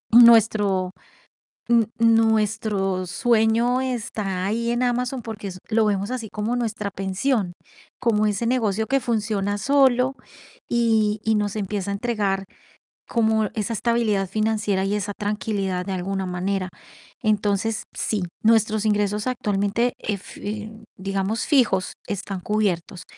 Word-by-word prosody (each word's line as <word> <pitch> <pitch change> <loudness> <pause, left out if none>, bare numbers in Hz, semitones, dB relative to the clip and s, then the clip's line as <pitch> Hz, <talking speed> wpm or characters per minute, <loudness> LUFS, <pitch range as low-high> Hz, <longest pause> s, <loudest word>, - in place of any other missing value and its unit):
nuestro, 215 -5 +6 0.8
n 235 -2 +4
nuestro 215 -4 +2
sueño 235 +4 +2
está 210 -7 -3
ahí 230 +3 -1
en 240 +1 0
Amazon, 250 +1 0
porque 215 -3 -6
es 185 -1 -7
lo 220 -1 +3
vemos 200 +1 0
así 235 -4 -4
como 220 +3 -2
nuestra 220 -4 -2
pensión, 195 +1 -1 0.5
como 215 -3 +2
ese 210 +3 -1
negocio 220 -3 +1
que 275 0 +2
funciona 210 -4 -1
solo 265 +1 +3 0.6
y 220 -3 +2
y 220 - +2
nos 210 0 -1
empieza 200 -1 -3
a - - -1
entregar 200 -4 -1 0.7
como 220 -2 +2
esa 220 0 -2
estabilidad 220 -3 +1
financiera 210 -1 0
y 200 - 0
esa 205 0 -2
tranquilidad 205 -3 -2
de 195 - -3
alguna 190 +1 -2
manera. 185 +1 -2 0.5
Entonces, 215 0 0
sí, 205 -4 -1 0.2
nuestros 220 -1 +3
ingresos 210 0 +1
actualmente, 220 0 0
ef 200 -3 -5
eh, 210 +1 -5 0.3
digamos 195 +3 -1
fijos, 235 - +2
están 195 -1 -4
cubiertos, 185 -3 -1
215 Hz, 125 wpm, -23 LUFS, 195-230 Hz, 0.8 s, nuestro